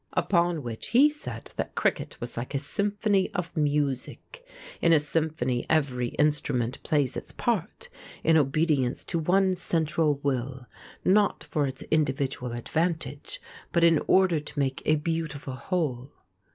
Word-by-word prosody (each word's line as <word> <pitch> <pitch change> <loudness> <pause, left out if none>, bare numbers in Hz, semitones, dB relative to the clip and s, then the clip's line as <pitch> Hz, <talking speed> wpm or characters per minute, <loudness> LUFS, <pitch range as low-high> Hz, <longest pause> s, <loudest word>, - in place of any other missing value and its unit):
Upon 170 -4 +1
which 115 -2 -6
he 280 +5 +5
said 295 - -8
that - - -3
cricket - - -1
was 120 - -5
like 125 +4 -4
a - - +3
symphony 200 +6 0
of 175 -1 -3
music. 145 - -2 0.4
In 170 - +5
a 160 - +6
symphony 150 -5 -1
every 135 -6 +1
instrument 140 -5 0
plays 145 -4 +1
its - - -5
part - - -2 0.4
in 165 - +4
obedience 145 -3 +2
to 170 - -2
one 185 +3 +3
central 160 -3 +1
will, 130 -1 -2 0.4
not 205 +2 +3
for 150 -4 -1
its 130 0 -6
individual 135 -4 0
advantage, 150 +2 -2 0.3
but 170 - +2
in 165 -2 +6
order 185 -4 +4
to 150 +1 -11
make 135 -1 -1
a 155 - +5
beautiful 150 -3 -3
whole. 130 -2 -2
150 Hz, 140 wpm, -27 LUFS, 135-170 Hz, 0.4 s, a